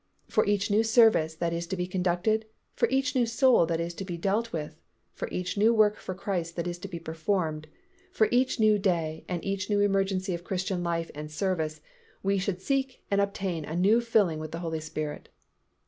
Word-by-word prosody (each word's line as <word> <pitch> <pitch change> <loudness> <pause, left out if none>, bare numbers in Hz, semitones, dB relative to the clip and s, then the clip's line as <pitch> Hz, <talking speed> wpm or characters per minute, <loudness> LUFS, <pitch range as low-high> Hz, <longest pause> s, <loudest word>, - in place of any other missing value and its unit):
For - - +2
each 205 0 +1
new 215 +2 +4
service 220 -8 +4
that 170 +1 -1
is 170 0 -3
to 190 +2 -3
be 180 - -1
conducted, 185 +4 0 0.3
for - - +2
each 265 0 +1
new 245 -2 +3
soul 230 -5 +4
that 165 -1 -1
is 170 +1 -3
to 195 - -6
be 175 -3 -5
dealt 205 +6 0
with, 155 0 -5 0.3
for - - -4
each 180 +2 -3
new 225 +3 +5
work 210 -1 +4
for 185 - -6
Christ 175 -3 -3
that 170 - -2
is 175 0 -4
to 195 - -6
be 180 -3 -6
performed, 160 -1 -2 0.4
for 220 -10 +3
each 255 0 +2
new 215 -1 +4
day 165 -5 -1
and 175 -2 -3
each 195 0 -2
new 205 -1 +2
emergency 195 -1 +1
of 170 0 -5
Christian 185 0 -2
life 170 -1 -2
and 150 +1 -7
service, 155 -2 -2 0.4
we 195 0 +2
should 185 -1 -2
seek 270 +2 -1
and 200 0 +3
obtain 195 -5 -2
a 155 +2 -5
new 205 +7 +4
filling 210 -9 +2
with 155 0 -6
the 165 - -5
Holy 160 -1 -2
Spirit. 155 -1 -5
185 Hz, 210 wpm, -28 LUFS, 165-205 Hz, 0.4 s, new